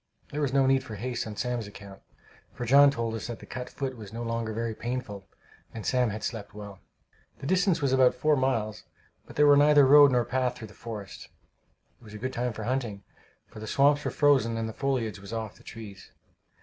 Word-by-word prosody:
There 150 - -3
was 140 -3 0
no 135 0 +3
need 135 0 +3
for 110 - -8
haste 120 +2 -4
on 105 - -7
Sam's 120 -1 -3
account, 100 -1 -12 0.5
for 120 - -5
John 140 +4 +7
told 115 -4 -2
us 115 - -5
that 120 -2 -5
the - - -13
cut 125 0 -6
foot 135 -2 -4
was 105 -4 -10
no 115 +1 -5
longer 115 -1 -2
very 115 +1 -3
painful, 110 -4 -5 0.5
and 110 - -6
Sam 125 -2 +2
had 110 +1 -6
slept 105 -3 -5
well. 100 -2 -9 0.6
The 135 - -9
distance 185 -1 +2
was 135 -1 +2
about 130 -1 +4
four 155 -1 +2
miles, 115 -6 -1 0.4
but - - -12
there 150 - +5
was 145 -1 +7
neither 145 -1 +6
road 145 +1 +8
nor 120 -2 +2
path 130 0 -1
through 110 -3 -9
the - - -15
forest. 105 -5 -8 0.7
It - - -22
was 105 -1 -12
a - - -5
good 130 +4 -4
time 125 0 -1
for 110 - -6
hunting, 115 -4 -3 0.4
for - - -13
the 110 - -7
swamps 145 +4 +3
were - - -1
frozen 135 -6 +2
and 115 0 -2
the 110 - -6
foliage 125 -7 -2
was 100 +3 -10
off 110 -2 -4
the - - -19
trees. 105 -4 -11
120 Hz, 225 wpm, -27 LUFS, 110-135 Hz, 0.7 s, road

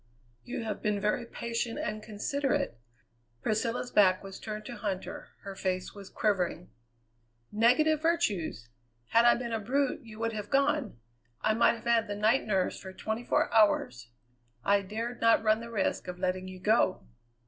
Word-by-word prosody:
"You 230 - -5
have 215 -2 -4
been 210 -1 0
very 210 +4 0
patient 235 0 -3
and 215 0 -3
considerate." 215 - -2 0.6
Priscilla's 230 +3 -1
back 185 -3 +4
was 195 -1 -8
turned 215 -1 -6
to 240 - -6
Huntter; 200 -3 -4 0.2
her 195 - -6
face 185 -1 -2
was 200 -2 -10
quivering. 180 -4 -1 0.8
"Negative 255 +8 +3
virtues! 205 - 0 0.4
Had 230 +1 +5
I 240 - +7
been 235 -1 -4
a 225 - 0
brute 270 +7 0
you 225 -4 -12
would 230 0 -1
have 210 -1 -5
gone. 275 - +1 0.4
I 215 - +3
might 235 +1 +4
have 230 - -12
had 230 -1 +3
the 205 - -3
night 220 +5 +2
nurse 190 -3 0
for 190 - -8
twenty 220 +4 -3
four 240 - +1
hours. 125 - +3 0.6
I 200 0 +4
dared 225 +5 -5
not 230 -1 +5
run 215 0 +3
the 235 0 -8
risk 210 -5 -1
of 180 0 -5
letting 185 0 -2
you 185 0 -9
go." 215 - +2
215 Hz, 170 wpm, -30 LUFS, 195-235 Hz, 0.8 s, I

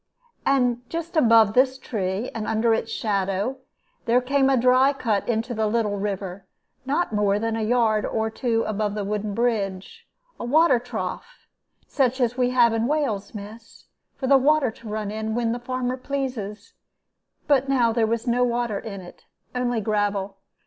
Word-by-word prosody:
And 250 -3 +2
just 335 +1 -5
above 230 -7 +5
this 260 +2 +3
tree, 200 -2 -3
and 225 -2 -4
under 225 +1 +2
its 225 0 -2
shadow, 200 +4 -1 0.5
there 240 +1 +4
came 270 +2 +2
a 270 - +3
dry 255 +3 +4
cut 225 -7 -1
into 230 +1 -1
the 220 -1 0
little 210 -2 0
river, 195 -2 -4 0.4
not 295 -1 0
more 205 -1 +2
than 225 +1 -1
a 225 - -2
yard 220 -1 +2
or 220 0 -1
two 230 -1 0
above 210 -1 -2
the 210 - -2
wooden 210 0 -3
bridge, 200 -6 -2 0.3
a - - -5
water 275 +1 +4
trough 235 - -6 0.4
such 260 -2 0
as 245 -1 +1
we 250 -1 +1
have 240 -2 +4
in 225 +1 0
Wales, 240 -10 -1
miss, 215 +3 -11 0.3
for 265 - -5
the 270 +1 +5
water 285 -2 +3
to 220 0 -12
run 210 -1 -3
in, 220 +1 -3
when 235 -1 0
the 240 - -3
farmer 255 +1 -3
pleases; 250 -6 -5 0.7
but 275 -2 +2
now 240 -4 +3
there 225 -1 +2
was 230 +1 -1
no 245 0 +2
water 240 -4 -1
in 200 -4 -7
it, 175 - -14 0.3
only 245 -2 0
gravel. 205 -2 -1
230 Hz, 170 wpm, -24 LUFS, 210-255 Hz, 0.7 s, above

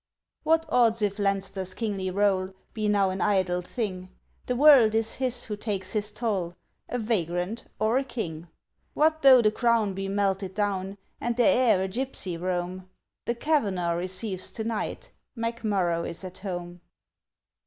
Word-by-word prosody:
What 325 +1 +2
odds 230 -3 +3
if 205 0 -1
Leinster's 195 -2 -1
kingly 200 -5 -2
roll 190 -1 +1 0.2
Be 215 -1 -1
now 200 -2 +3
an 185 - -4
idle 185 -3 +1
thing? 185 -2 -4 0.4
The 250 - 0
world 255 -6 +7
is 225 0 0
his 255 -2 0
who 210 - -4
takes 200 -3 -3
his 210 -1 0
toll, 200 -6 -2 0.3
A 245 - -2
vagrant 200 -2 -1
or 220 +4 +2
a - - -2
king. 170 -11 -5 0.5
What 315 +1 +3
though 260 -3 +8
the 215 - +4
crown 230 -3 +2
be 195 +1 -4
melted 195 -1 -1
down, 200 -2 -1 0.2
And 240 0 -2
the 245 - +4
heir 245 -9 +4
a - - -1
gypsy 210 -4 -3
roam? 180 0 -3 0.4
The 235 - 0
Kavanagh 205 - +1
receives 185 +2 -3
to 220 - -3
night! 225 -1 -4 0.3
McMurrough 205 -7 -1
is 170 - -8
at 185 0 -8
home! 175 -2 -6
205 Hz, 155 wpm, -27 LUFS, 185-230 Hz, 0.5 s, though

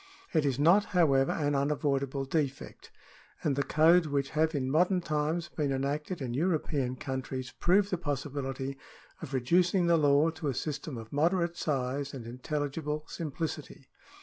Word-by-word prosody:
It 155 -3 +3
is 130 -3 0
not, 170 +8 +5
however, 135 -6 +4
an 145 -2 0
unavoidable 140 -1 0
defect, 140 -1 -3 0.5
and 145 -3 +1
the 140 - +1
codes 160 +4 +4
which 140 -2 -1
have 160 +1 +1
in 130 -2 -1
modern 180 +5 +3
times 160 +1 -1
been 145 -3 -1
enacted 145 +4 -2
in 120 -2 -3
European 145 -4 0
countries 130 -1 -4
prove 195 +3 +3
the 180 - -1
possibility 135 -3 -3 0.4
of 160 -4 -7
reducing 175 +8 +2
the 170 -1 +4
law 145 +1 +4
to 160 -1 -5
a 135 - -1
system 150 -1 -4
of 110 +2 -9
moderate 170 +3 +1
size 140 -2 -2
and 120 -4 -7
intelligible 150 +4 -3
simplicity. 155 -3 -5
145 Hz, 150 wpm, -30 LUFS, 135-165 Hz, 0.5 s, not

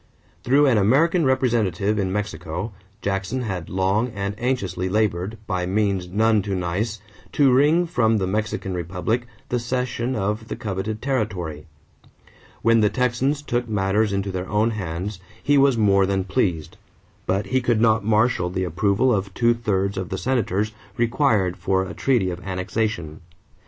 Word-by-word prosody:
Through 140 +4 +4
an 125 -6 +4
American 155 - +3
representative 110 -6 +1
in 95 -2 0
Mexico, 90 0 -4 0.3
Jackson 100 +6 -2
had 95 -7 -4
long 95 +5 +1
and 100 0 -2
anxiously 95 -8 -1
labored, 105 0 0
by 90 -3 -2
means 100 -2 0
none 110 +2 +3
too 100 0 -3
nice, 95 +5 -2 0.3
to 140 -3 +4
wring 150 +7 +4
from 115 -9 +2
the 95 - 0
Mexican 105 0 -2
republic 90 +8 -2 0.2
the 125 - 0
cession 125 +1 -2
of 105 +2 -2
the - - -4
coveted 105 +1 -4
territory. 95 - -2 1.0
When 115 0 +5
the 105 -1 +4
Texans 130 +4 0
took 120 -3 -2
matters 105 +1 +1
into 100 0 -1
their 90 0 -4
own 110 +2 +2
hands, 95 -1 -4 0.2
he 145 - +3
was 135 -3 +4
more 100 -3 +4
than 95 -1 0
pleased; 90 -4 -1 0.5
but 95 +2 0
he 130 - +3
could 120 -2 +1
not 110 -1 +3
marshal 110 -3 +2
the 95 +1 -2
approval 100 +8 +2
of 100 -1 -1
two 120 -1 +3
thirds 100 -4 -1
of 95 - -5
the 95 - -3
Senators 110 -4 0 0.3
required 115 -7 +2
for 95 +1 +1
a 95 -2 -6
treaty 115 -7 +1
of 90 - -6
annexation. 95 -3 -3
105 Hz, 155 wpm, -23 LUFS, 95-120 Hz, 1.0 s, When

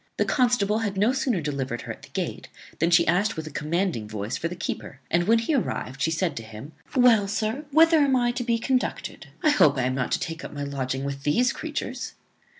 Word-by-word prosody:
The - - +2
constable 235 -5 +2
had 205 -3 -2
no 215 +6 +3
sooner 255 -8 0
delivered 135 -5 -3
her - - -6
at - - -16
the - - -14
gate - - -4 0.3
than 165 - +3
she 170 - +5
asked 195 +6 +2
with 160 - -4
a 155 - -7
commanding 155 - -1
voice 105 0 -4
for 165 - -2
the 175 - -6
keeper; 155 -5 -5
and, 175 +1 +2
when 230 +1 +5
he 230 +7 0
arrived, 135 - -2
she 160 - +2
said 165 -1 -1
to - - -3
him, 110 +6 -10 0.2
"Well, 235 -6 +5
sir, 215 +8 -2
whither 325 +2 +6
am 280 -2 +3
I 240 -1 +2
to 245 0 -3
be 235 -1 +1
conducted? 255 +2 -2 0.2
I 305 - +5
hope 150 - +4
I 130 - +1
am 130 +1 0
not 130 -1 -2
to - - +1
take 165 -1 -5
up - - -7
my 145 -1 -5
lodging 135 -1 -3
with 140 0 -4
these 235 - +2
creatures." 280 -5 -5
185 Hz, 235 wpm, -25 LUFS, -, 0.3 s, whither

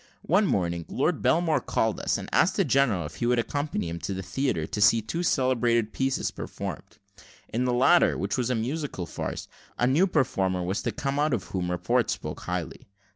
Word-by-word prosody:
One 195 +5 +3
morning, 85 - -1
Lord - - 0
Belmore 160 -4 +2
called 110 -2 0
upon - - -7
us, - - +2
and - - -7
asked - - +3
the - - +2
general 120 - +2
if 75 +1 -9
we 120 - +2
would 125 0 +3
accompany 145 - -2
him 85 +1 -5
to 95 +4 -4
the 95 - -5
theatre, 130 - -1
to 105 - -4
see 115 +1 +6
two 140 +10 -3
celebrated 120 -7 +1
pieces 135 0 0
performed. - - -7 0.6
In 120 +3 +1
the 125 - +1
latter, 135 +8 +4
which - - -1
was 125 -1 -1
a 125 - +1
musical 125 - -3
farce, - - -5 0.3
a 120 - +2
new 150 +10 +4
performer 95 - 0
was 95 +3 -2
to - - -2
come 140 +1 -2
out 150 -3 +2
of 100 - -4
whom 90 -2 -3
report 90 0 +1
spoke - - -4
highly. 90 -2 -5
120 Hz, 205 wpm, -27 LUFS, 95-140 Hz, 0.6 s, see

